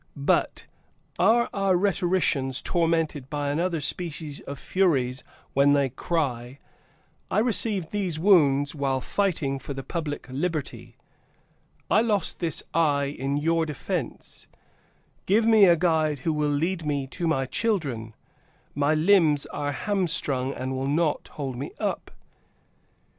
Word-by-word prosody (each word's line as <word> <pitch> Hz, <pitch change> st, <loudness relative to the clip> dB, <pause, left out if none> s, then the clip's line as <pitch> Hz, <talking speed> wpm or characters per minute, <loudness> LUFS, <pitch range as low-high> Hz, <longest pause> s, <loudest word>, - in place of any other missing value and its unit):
But) 140 Hz, 0 st, 0 dB, 0.5 s
are 230 Hz, +5 st, +4 dB
our 195 Hz, -2 st, +2 dB
rhetoricians 175 Hz, -8 st, +1 dB
tormented 165 Hz, -5 st, 0 dB
by 145 Hz, -1 st, -2 dB
another 170 Hz, +2 st, -1 dB
species 155 Hz, -1 st, -3 dB
of 140 Hz, -, -8 dB
Furies 140 Hz, -8 st, 0 dB, 0.3 s
when 140 Hz, +1 st, +4 dB
they 140 Hz, -2 st, +2 dB
cry, 130 Hz, -3 st, -3 dB, 0.7 s
"I -, -, -1 dB
received 215 Hz, -5 st, +1 dB
these 185 Hz, -6 st, -2 dB
wounds 145 Hz, -7 st, +4 dB
while 135 Hz, -3 st, -1 dB
fighting 150 Hz, -4 st, -1 dB
for 140 Hz, -, -7 dB
the 135 Hz, -, -6 dB
public 150 Hz, +1 st, -4 dB
liberty; 130 Hz, -5 st, -4 dB, 0.9 s
I 215 Hz, -, +5 dB
lost 210 Hz, -6 st, 0 dB
this 170 Hz, -3 st, 0 dB
eye 145 Hz, -3 st, +1 dB
in 135 Hz, +2 st, -2 dB
your 165 Hz, +2 st, +1 dB
defense: 150 Hz, -3 st, -5 dB, 0.8 s
give 220 Hz, +4 st, +3 dB
me 220 Hz, -3 st, +6 dB
a 175 Hz, -2 st, +6 dB
guide 160 Hz, -3 st, +1 dB
who 160 Hz, -, +2 dB
will 150 Hz, -1 st, 0 dB
lead 165 Hz, +4 st, -1 dB
me 145 Hz, -2 st, -1 dB
to 170 Hz, +6 st, -4 dB
my 135 Hz, -4 st, +1 dB
children, 135 Hz, -, -2 dB, 0.6 s
my 145 Hz, +2 st, +1 dB
limbs 155 Hz, -3 st, +4 dB
are 145 Hz, 0 st, -3 dB
hamstrung 145 Hz, -6 st, 0 dB
and 130 Hz, 0 st, -4 dB
will 135 Hz, +1 st, -2 dB
not 150 Hz, +1 st, 0 dB
hold 135 Hz, -4 st, -4 dB
me 140 Hz, -, -6 dB
up!" -, -, -3 dB
150 Hz, 130 wpm, -25 LUFS, 140-180 Hz, 0.9 s, me